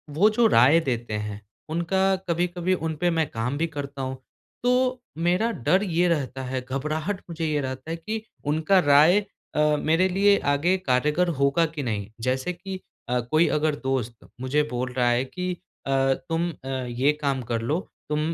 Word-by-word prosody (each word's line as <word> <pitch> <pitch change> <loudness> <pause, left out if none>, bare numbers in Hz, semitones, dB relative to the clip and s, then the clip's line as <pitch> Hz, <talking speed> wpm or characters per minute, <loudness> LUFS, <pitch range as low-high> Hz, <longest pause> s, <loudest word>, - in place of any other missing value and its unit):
वो 200 +7 +5
जो 230 +2 +2
राय 140 - +6
देते 120 -7 -3
हैं 105 0 -4 0.3
उनका 190 +4 +1
कभी-कभी 175 +2 0
उन 160 -2 -2
पर 175 - +3
मैं 160 -3 0
काम 125 +5 -2
भी 165 +2 0
करता 140 -3 -6
हूँ। 130 0 -3 0.5
तो 250 0 +2 0.2
मेरा 180 +7 +1
डर 185 - +1
ये 175 -2 +1
रहता 135 -5 -1
है, 130 0 -3
घबराहट 155 +9 -3
मुझे 165 -1 -3
ये 150 -2 0
रहता 130 +2 -5
है - - -1
कि 215 +7 -4 0.2
उनका 160 +6 +3
राय 155 +5 +6 0.4
अ, - - +1 0.2
मेरे 165 +5 +3
लिए 200 +2 +4 0.2
आगे 175 +6 +2
कारगर 150 +2 +1
होगा 140 +4 +3
कि 155 -3 -5
नहीं। 105 -4 -2
जैसे 130 +8 -1
कि 190 +2 -7 0.5
कोई 155 +2 +4
अ, - - -1
अगर 150 0 +1
दोस्त 125 -4 -3
मुझे 135 +3 +1
बोल 125 +1 -2
रहा 125 -1 +2
है 120 +1 +2
कि 180 +6 -4 0.4
अ, - - -3 0.4
तुम 165 +1 0
अ, 135 - -13
ये 130 +1 0
काम 140 -2 0
कर 115 -1 0
लो, 150 +9 0 0.3
तुम 150 0 0
155 Hz, 180 wpm, -25 LUFS, 130-180 Hz, 0.5 s, राय